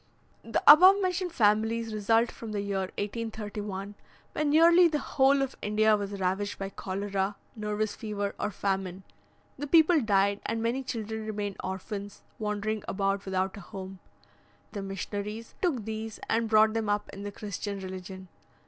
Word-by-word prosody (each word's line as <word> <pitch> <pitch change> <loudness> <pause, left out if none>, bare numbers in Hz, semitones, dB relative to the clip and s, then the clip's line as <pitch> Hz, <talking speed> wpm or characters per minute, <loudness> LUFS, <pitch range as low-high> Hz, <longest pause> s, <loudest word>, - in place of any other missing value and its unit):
The 225 -1 -1
above 370 +7 +9
mentioned 365 -1 -1
families 225 -2 +2
result 225 +3 +2
from 225 -2 -8
the 205 - -1
year 195 -2 -2
1831, 205 -2 -4 0.4
when 305 -1 0
nearly 335 +3 +7
the 310 -2 0
whole 275 -1 +3
of 270 - -4
India 215 +1 +3
was 200 -1 -4
ravaged 190 +2 -1
by 195 0 -4
cholera, 195 +1 -2 0.2
nervous 210 -1 -2
fever, 205 -2 -3
or - - -1
famine; 195 -2 -2 0.6
the 290 - -3
people 320 +1 +5
died, 200 -2 +2
and 225 +1 -1
many 235 +4 0
children 220 -4 -5
remained 205 -2 -3
orphans, 200 +2 -6 0.2
wandering 210 0 -2
about 195 0 -1
without 190 +1 -1
a - - -8
home. 190 +1 -8 0.7
The 205 - -5
missionaries 205 +3 -5
took 275 - 0
these, 220 0 -5
and 230 0 +1
brought 215 0 +5
them 225 -2 -1
up 205 0 0
in 195 - -8
the 205 0 -5
Christian 200 0 -5
religion. 190 0 -8
210 Hz, 155 wpm, -28 LUFS, 200-230 Hz, 0.7 s, above